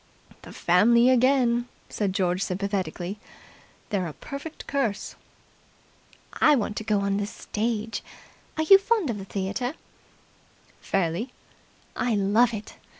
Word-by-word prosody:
"The - - -11
family 235 +8 +4
again!" 250 -1 +3 0.2
said 205 -3 -1
George 185 -1 0
sympathetically. 195 -1 -3 0.7
"They're 190 -4 0
a 155 - -7
perfect 280 - -8
curse." 235 -9 -2 1.2
"I 300 - +5
want 210 -4 -1
to - - -3
go 210 -2 +1
on 200 0 0
the 205 0 -1
stage. 220 +1 -3 0.6
Are 315 - +1
you 390 +5 +8
fond 400 - +1
of 210 - -5
the 195 - -7
theatre?" 205 +8 -3 1.1
"Fairly." 195 +6 -1 0.6
"I 240 -3 0
love 210 +4 +3
it. 215 -2 -7
215 Hz, 125 wpm, -26 LUFS, 195-245 Hz, 1.2 s, you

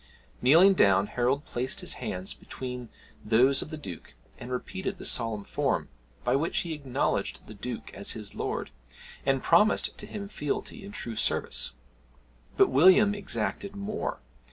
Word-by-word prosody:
Kneeling 170 +9 +7
down, 100 - +4
Harold 125 +6 0
placed 125 +2 -2
his - - -1
hands 95 +1 -3
between 125 -2 -7 0.3
those 125 +5 +4
of - - -6
the 155 - -6
Duke, 90 - -9 0.2
and 125 - -8
repeated 190 +9 -4
the - - -8
solemn 110 -3 0
form, - - -1 0.3
by - - +2
which 155 +5 +1
he 170 -2 -4
acknowledged 140 -5 -2
the - - -10
Duke 120 +3 -6
as 100 - -1
his 105 -2 -6
lord, - - -3 0.6
and 135 -1 +2
promised 205 +6 +4
to - - -4
him 200 -2 -6
fealty 200 +5 -4
and 200 +1 -9
true 115 -1 -4
service. 105 - 0 0.8
But - - +6
William 190 +8 +6
exacted 200 0 -3
more. 200 - -4
135 Hz, 155 wpm, -28 LUFS, 115-190 Hz, 0.8 s, Kneeling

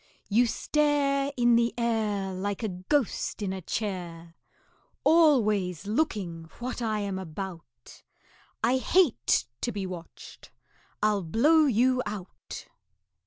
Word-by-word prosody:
You 235 +4 +4
stare 285 +1 +1
In 240 -1 +4
the 235 0 +2
air 215 -5 0
Like 200 +3 -3
a 220 - 0
ghost 205 +4 -1
in 190 -1 -2
a 190 - -5
chair, 170 -4 -4 0.7
Always 215 - +3
looking 200 - -1
what 245 +1 -5
I 215 -2 -1
am 195 -2 -3
about; 165 -8 -9 0.6
I 245 +3 +3
hate 270 - +3 0.2
to 240 - -1
be 200 -3 -4
watched 180 -2 -10 0.5
I'll 210 -1 +3
blow 290 - +4
you 255 +1 +3
out." 205 -3 -8
210 Hz, 120 wpm, -28 LUFS, 185-250 Hz, 0.7 s, You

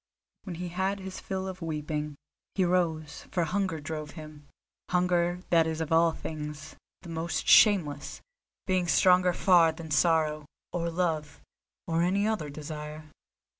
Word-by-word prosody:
When 185 -4 -5
he 175 +1 -5
had 190 +3 -1
his 190 0 -7
fill 190 0 -4
of 185 -1 -7
weeping, 150 -2 -3 0.4
he 190 - +2
rose, 165 -4 -1
for 175 - 0
hunger 185 0 -1
drove 150 0 -5
him—hunger 175 +4 -2
that 165 -2 +5
is 160 0 -3
of 160 -1 -3
all 165 +1 +5
things 150 -1 -7 0.3
the 175 - -10
most 165 0 -3
shameless, 160 -10 +4 0.5
being 185 -2 +1
stronger 180 +1 +5
far 175 -2 +5
than 160 0 -9
sorrow, 155 -1 +2 0.3
or 170 -1 -1
love, 165 -3 -2 0.5
or 165 0 0
any 195 +4 +2
other 215 -9 -1
desire. 150 +1 -8
165 Hz, 140 wpm, -28 LUFS, 155-180 Hz, 0.5 s, that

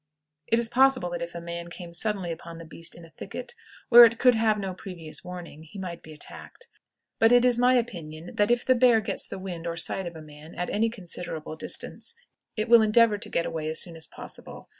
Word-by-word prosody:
It 230 - +3
is 235 -1 +2
possible 255 -6 +3
that 175 -1 -4
if 170 0 -5
a - - -4
man 170 0 -6
came 170 0 -9
suddenly 190 -1 -1
upon 165 0 -8
the 165 - -9
beast 165 +1 -8
in 170 - -12
a 165 - -18
thicket, 200 +9 -8 0.4
where 240 0 +11
it 230 0 +5
could 250 +1 +5
have 220 -1 +2
no 195 -2 -3
previous 175 -4 -9
warning, 180 -4 -8
he 160 +6 -12
might 180 -3 -6
be 155 - -13
attacked; 315 - -10 0.5
but 225 +1 +5
it 245 0 +6
is 245 -1 +3
my 250 +1 +5
opinion 170 -8 -3
that 205 +1 +2
if 240 0 +2
the 260 - +5
bear 245 -2 +5
gets 205 -2 -3
the - - -6
wind 180 -3 -6
or 165 0 -3
sight 190 +2 -1
of 170 - -8
a 160 - -9
man 150 +1 -13
at 180 - -3
any 225 +2 +2
considerable 175 -7 -6
distance, 465 - -4 0.4
it 215 +2 -1
will 235 -1 +8
endeavor 215 -1 +4
to - - -4
get 170 - 0
away 155 -1 -3
as 160 - -3
soon 170 -2 -5
as 160 - -6
possible. - - -10
185 Hz, 230 wpm, -27 LUFS, 170-230 Hz, 0.5 s, where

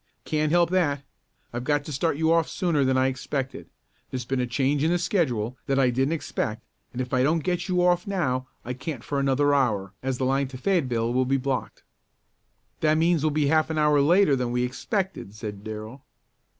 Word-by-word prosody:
"Can't 155 -1 0
help 170 0 +3
that. 145 -7 +1 0.5
I've 120 +1 -3
got 145 +1 +1
to - - -6
start 145 +2 0
you 160 +1 +3
off 165 -1 +2
sooner 165 -6 +1
than 130 0 +2
I 130 - +3
expected. 130 +1 -3 0.4
There's 125 -2 -4
been 135 +1 -1
a 125 - 0
change 140 +3 +1
in 160 - +3
the 175 - +2
schedule 130 - -1
that 135 -1 +1
I 130 -2 +4
didn't 135 +5 +1
expect, 110 -8 -3 0.3
and 125 - -7
if 125 -1 -3
I 130 - +3
don't 155 +4 +2
get 180 -1 -1
you 180 -1 +2
off 175 0 +2
now 130 -10 -1 0.2
I 125 - -3
can't 130 -1 -6
for 140 0 -2
another 140 +1 +2
hour, 105 -8 +1
as 130 -1 -2
the 130 - -1
line 135 +1 +1
to 130 0 -9
Fayetteville 125 -9 0
will 130 +1 +2
be 135 +2 +2
blocked." 135 -1 -3 1.0
"That 155 0 +3
means 165 -1 +3
we'll 155 - +3
be 150 0 +1
half 155 +2 +3
an 160 - -2
hour 150 -1 +4
later 170 +1 +4
than 125 -2 -2
we 125 0 0
expected," 155 - -3
said 105 -2 -7
Darrell. 110 +5 -7
140 Hz, 210 wpm, -25 LUFS, 125-160 Hz, 1.0 s, I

